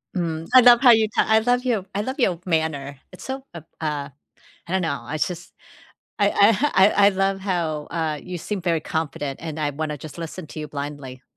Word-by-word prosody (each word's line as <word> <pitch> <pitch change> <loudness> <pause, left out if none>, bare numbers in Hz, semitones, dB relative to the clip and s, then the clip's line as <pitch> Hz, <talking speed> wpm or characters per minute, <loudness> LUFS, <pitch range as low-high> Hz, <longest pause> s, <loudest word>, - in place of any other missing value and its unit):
Mm, 165 -2 -3
I 255 - +9
love 240 -1 +7
how 255 - +7
you 220 -1 +4
ta - - +4
I 220 0 +5
love 245 +2 +1
you 220 -7 0
I 205 - -1
love 260 +5 -5
your 180 -8 +1
manner. 150 -5 -2
It's 180 - -12
so 265 0 -5
ab 160 -2 -10
uh, 150 -3 -3 0.6
I - - -8
don't 190 0 +1
know, 160 -4 -2
I 155 - -5
just 175 +2 -4 0.7
I 205 0 +3
I 200 +1 +5
ha 285 +9 +1
I 190 +2 +6 0.2
I - - +8
love 195 0 0
how, 165 -6 -2
uh, 160 -3 -2
you 180 -1 -6
seem 200 +3 -4
very 170 -3 0
confident, 150 -3 -4
and 160 -2 -6
I 145 -1 0
wanna 150 +1 -4
just 155 +2 -11
listen 165 +1 -7
to 155 - -7
you 150 - -5
blindly. 140 -3 -7
170 Hz, 220 wpm, -23 LUFS, 150-200 Hz, 0.7 s, I